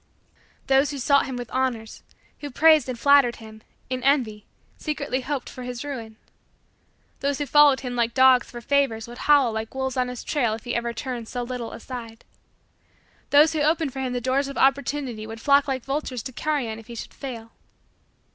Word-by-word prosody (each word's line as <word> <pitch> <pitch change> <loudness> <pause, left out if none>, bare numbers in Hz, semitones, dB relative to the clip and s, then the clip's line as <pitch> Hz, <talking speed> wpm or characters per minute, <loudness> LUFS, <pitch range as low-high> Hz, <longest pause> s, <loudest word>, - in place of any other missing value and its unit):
Those 270 +1 +3
who 290 - -5
sought 280 +2 +3
him 260 - -5
with 245 -2 -7
honors 250 -4 -2 0.4
who 290 - -6
praised 310 -1 +4
and 250 - -4
flattered 280 -1 +5
him, 220 -1 -13 0.3
in 255 0 -3
envy, 240 -6 +1 0.3
secretly 285 -4 -2
hoped 270 0 -4
for 255 - -9
his 245 0 -5
ruin. 230 -6 -6 1.0
Those 280 0 -1
who 290 - -2
followed 290 -2 +5
him 250 -2 -5
like 235 -1 0
dogs 260 -2 +5
for 240 - -9
favors 235 -4 0
would 240 +1 -10
howl 280 -5 +6
like 220 +2 -5
wolves 265 -1 -2
on 250 -1 +1
his 250 -1 -7
trail 240 -8 0
if 220 - -11
he 245 - -5 0.2
turned 235 0 -5
ever - - -11
so 245 -1 -3
little 240 -1 -5
aside. 230 -2 -9 1.0
Those 300 +3 +5
who 310 - -1
opened 310 -2 +1
for 270 - -6
him 255 -1 -2
the 245 - -2
doors 265 +3 0
of 275 - -7
opportunities 270 -4 0
would 225 0 -8
flock 280 +3 +3
like 260 -3 -2
vultures 270 -4 -3
to 260 - -6
carrion 255 -5 -2
if 225 - -15
he 235 - -9
should - - -8
fall. 230 -5 -8
255 Hz, 195 wpm, -24 LUFS, 235-280 Hz, 1.0 s, howl